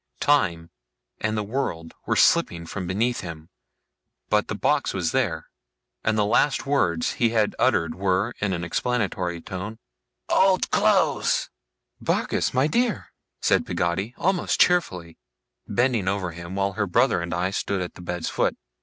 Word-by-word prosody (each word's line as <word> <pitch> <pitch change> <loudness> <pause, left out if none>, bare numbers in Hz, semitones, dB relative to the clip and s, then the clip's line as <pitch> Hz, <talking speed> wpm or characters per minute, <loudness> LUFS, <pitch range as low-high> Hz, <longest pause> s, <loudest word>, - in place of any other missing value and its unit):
Time 85 -13 +1 0.5
and 110 0 -1
the 105 - 0
world 100 -8 -3
were - - +1
slipping 85 -1 +3
from 90 +2 -5
beneath 115 +7 0
him, 80 -3 -8 0.8
but - - +2
the - - -3
box - - +1
was 90 -4 0
there; 95 -12 0 0.6
and 110 0 +1
the 105 - +3
last 135 +6 +2
words 90 - +1
he 120 - +2
had 110 -2 +1
uttered 85 -1 +2
were 95 +4 0
(in 100 -1 0
an 85 -2 -2
explanatory 90 -3 -1
tone) 95 +6 -6 0.5
'Old 190 -1 +3
clothes!' - - +2 0.5
'Barkis, - - 0
my 130 +2 +2
dear!' 235 +8 0 0.3
said - - +3
Peggotty, 95 +7 -2
almost 185 -1 0
cheerfully: 90 - +2 0.5
bending 120 -5 +1
over 95 -2 -1
him, 85 +2 -8
while 100 0 0
her 100 0 -1
brother 85 - +2
and 85 0 -5
I 90 +3 -1
stood 100 0 -2
at 90 -1 -4
the - - -12
bed's 90 -1 -4
foot. - - 0
95 Hz, 155 wpm, -24 LUFS, 85-120 Hz, 0.8 s, slipping